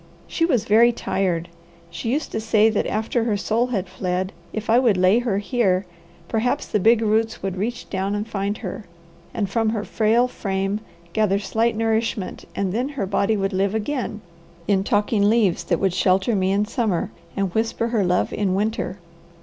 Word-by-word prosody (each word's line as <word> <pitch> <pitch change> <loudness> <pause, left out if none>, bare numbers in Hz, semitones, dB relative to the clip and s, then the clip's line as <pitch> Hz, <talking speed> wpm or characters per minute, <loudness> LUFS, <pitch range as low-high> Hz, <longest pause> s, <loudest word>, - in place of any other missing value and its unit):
She 330 - 0
was 255 -10 +1
very 230 +3 +5
tired. 180 -7 -1 0.4
She 200 +7 -3
used 295 +4 -1
to - - -2
say 220 0 +4
that 215 - 0
after 225 +2 -1
her 215 -3 +1
soul 225 +4 0
had 200 -7 -2
fled, 185 +1 -2 0.2
if 220 0 -5
I 230 +2 +5
would 230 -7 +3
lay 185 +5 +4
her 235 -5 0
here, 200 -3 +1 0.4
perhaps 245 +7 0
the 210 - 0
big 225 +3 +4
roots 220 0 0
would 190 -1 -2
reach 225 +6 -3
down 195 +1 -2
and 205 +1 -3
find 205 -1 -2
her, 195 +3 -5 0.5
and 215 -5 -1
from 225 +3 +1
her 215 -2 -2
frail 230 +3 +2
frame 195 -3 -2 0.3
gather 210 -3 +2
slight 225 +3 0
nourishment 225 -3 -1
and 190 -2 -1
then 250 +5 -1
her 275 -8 -3
body 200 +2 +1
would 195 0 -1
live 195 +2 +1
again 220 -1 -3 0.5
in 195 -1 +2
talking 205 0 +2
leaves 215 -6 +2
that 170 - +1
would 190 -2 +1
shelter 190 +4 +2
me 190 -1 +1
in 200 +2 +2
summer 210 -5 -1 0.3
and 195 -3 -1
whisper 230 +1 0
her 225 -4 +1
love 180 0 +1
in 195 -3 0
winter. 205 -2 -1
210 Hz, 185 wpm, -22 LUFS, 195-225 Hz, 0.5 s, very